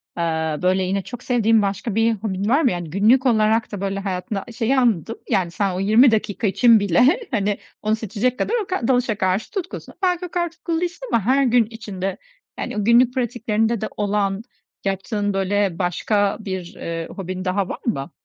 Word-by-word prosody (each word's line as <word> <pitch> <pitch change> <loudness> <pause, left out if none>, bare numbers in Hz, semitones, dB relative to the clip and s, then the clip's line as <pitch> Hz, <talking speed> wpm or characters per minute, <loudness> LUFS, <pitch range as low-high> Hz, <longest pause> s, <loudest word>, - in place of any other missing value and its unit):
aaa, 160 -2 -1
böyle 185 +1 +2
yine 195 +2 -1
çok 245 +3 -9
sevdiğim 225 -3 +3
başka 200 +2 -2
bir 225 +1 +3
hobin 200 -1 -3
var 280 +6 +4
mı? 255 - +3
Yani, 175 -2 -4
günlük 220 - +3
olarak 220 -2 +2
da 200 -2 -5
böyle 195 0 -2
hayatında 195 +1 -3
a - - -9
şeyi 240 +3 0
anladım, 225 -3 +1
yani, 190 -6 +1
sen 195 0 -1
o 185 - -3
20 220 +6 +5
dakika 215 0 0
için 230 +3 +5
bile, 245 - +3
hani, 205 -2 0 0.2
onu 215 +1 +1
seçecek 225 +3 -2
kadar - - -1
o - - -13
kad 370 -11 -2
dalışa 245 -5 +1
karşı 190 +2 0
tutkusun. 375 -4 -6
Belki 360 -1 +1
o 355 - -8
kadar 345 -1 -1
tutkulu 335 0 -3
değilsin 355 +8 -4
ama 230 - +3
her 270 +3 +3
gün 245 -2 +4
içinde, 200 -4 -5 0.4
yani - - -4
günlük 235 +3 +5
pratiklerinde 235 -3 0
de 215 - -1
olan, 205 -1 0 0.4
yaptığın 205 +1 -1
böyle 195 -2 0
başka 200 +3 0
bir, 190 -4 -6
ııı, 165 0 -5
hobin 185 -1 -5
daha 190 +1 0
var - - -5
mı? 165 - -2
210 Hz, 190 wpm, -21 LUFS, 195-240 Hz, 0.4 s, 20